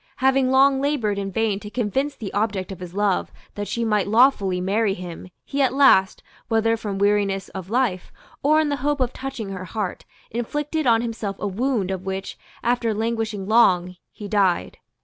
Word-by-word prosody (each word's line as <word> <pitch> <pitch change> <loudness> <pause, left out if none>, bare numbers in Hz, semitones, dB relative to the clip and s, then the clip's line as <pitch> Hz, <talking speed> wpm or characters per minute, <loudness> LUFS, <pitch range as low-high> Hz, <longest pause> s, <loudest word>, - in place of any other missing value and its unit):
Having 265 -1 +2
long 270 +1 +4
laboured 240 -9 0
in 195 0 -4
vain 215 -1 0
to 210 - -9
convince 255 +6 -1
the 210 -5 -7
object 200 -2 -1
of 190 - -8
his 180 0 -9
love 205 -2 0 0.2
that 205 0 -5
she 235 0 -2
might 210 -3 +1
lawfully 210 -5 +3
marry 195 +2 +1
him, 180 0 -8 0.2
he 280 0 -2
at 265 -1 +2
last, 265 -9 +4 0.2
whether 225 0 +2
from 210 -3 -4
weariness 200 -1 +1
of 190 -1 -8
life, 225 -6 0 0.3
or 305 +2 +4
in 310 -1 +1
the 285 - -1
hope 290 +2 -1
of 255 -1 0
touching 260 -6 -5
her 185 -1 -6
heart, 205 0 -4 0.3
inflicted 295 +6 -2
on 230 0 +4
himself 220 -4 -4
a - - -3
wound 205 -1 -1
of 190 -1 -4
which, 190 0 -4 0.3
after 235 -2 +1
languishing 220 -3 -2
long, 185 -5 +4 0.2
he 205 - -8
died. 195 -4 +1
215 Hz, 185 wpm, -23 LUFS, 195-255 Hz, 0.3 s, long